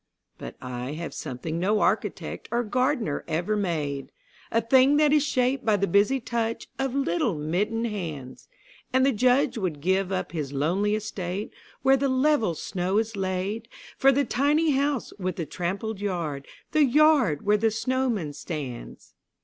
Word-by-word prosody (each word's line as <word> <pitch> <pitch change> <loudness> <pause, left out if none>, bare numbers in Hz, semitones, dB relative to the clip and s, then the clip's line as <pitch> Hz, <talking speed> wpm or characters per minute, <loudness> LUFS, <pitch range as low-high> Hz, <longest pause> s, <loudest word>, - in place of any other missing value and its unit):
But - - -8
I 125 +2 -5
have 165 +2 -6
something 155 +6 -5
no 205 +4 +2
architect - - -1
or 240 +1 0
gardener 250 - 0
ever 175 +7 0
made, 150 -9 -2 0.4
A 230 - +3
thing 260 +5 +4
that 300 -1 +4
is 300 -2 +4
shaped 260 -1 +1
by 215 -2 +3
the 200 - +1
busy 200 +8 +3
touch 230 -2 -2
of 270 -1 -1
little 205 -6 +1
mittened 190 +10 -1
hands: 165 - -6 0.4
And 260 +1 +3
the 275 - +4
Judge 250 +2 +2
would 175 -7 -2
give 190 +4 +1
up 185 - -2
his 150 -5 -4
lonely 185 +9 +1
estate, 200 -2 -4 0.3
where 270 0 +5
the 275 +1 0
level 260 - +2
snow 185 +4 -2
is 225 0 0
laid 195 +4 -2 0.3
For 270 - +5
the 280 +1 +2
tiny 295 +4 +2
house 280 -2 0
with 185 -2 -2
the 165 - -3
trampled 195 +6 -4
yard, 165 -8 -3 0.2
the 310 -1 +4
yard 280 - +4
where 210 +1 +4
the 225 +2 +2
snowman 230 - -1
stands. 145 -5 -7
210 Hz, 160 wpm, -26 LUFS, 170-255 Hz, 0.4 s, where